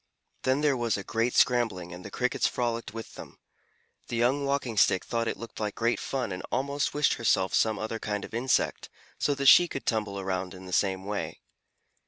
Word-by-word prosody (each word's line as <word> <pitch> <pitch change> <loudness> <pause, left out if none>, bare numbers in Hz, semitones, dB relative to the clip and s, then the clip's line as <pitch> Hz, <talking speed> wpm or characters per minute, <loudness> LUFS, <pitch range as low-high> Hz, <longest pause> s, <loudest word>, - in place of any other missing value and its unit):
Then 130 +2 +1
there 150 -2 +3
was 120 -4 0
a 100 - -5
great 115 +5 -1
scrambling 115 -8 +2
and 90 +1 -9
the 100 - -7
Crickets 125 +4 0
frolicked 120 -1 -2
with 115 +1 -8
them. - - -11 0.7
The - - -4
young 130 +5 +2
Walking 140 -4 -1
Stick 95 -2 +3
thought 115 -1 -1
it - - -2
looked 115 - -9
like 105 -1 -2
great 115 +1 +1
fun 130 -6 -3
and 90 0 -4
almost 140 +2 -1
wished 150 0 +3
herself 95 -5 +1
some 110 -1 +2
other 110 +2 -4
kind 105 -2 -3
of - - -14
insect, 120 +3 0 0.3
so 145 - +1
that 140 0 -3
she 175 +5 +8
could 135 - -6
tumble 105 -3 -1
around 95 -1 -3
in 95 0 -11
the 90 - -8
same 95 -1 +1
way. 100 0 -4
115 Hz, 205 wpm, -28 LUFS, 100-130 Hz, 0.7 s, she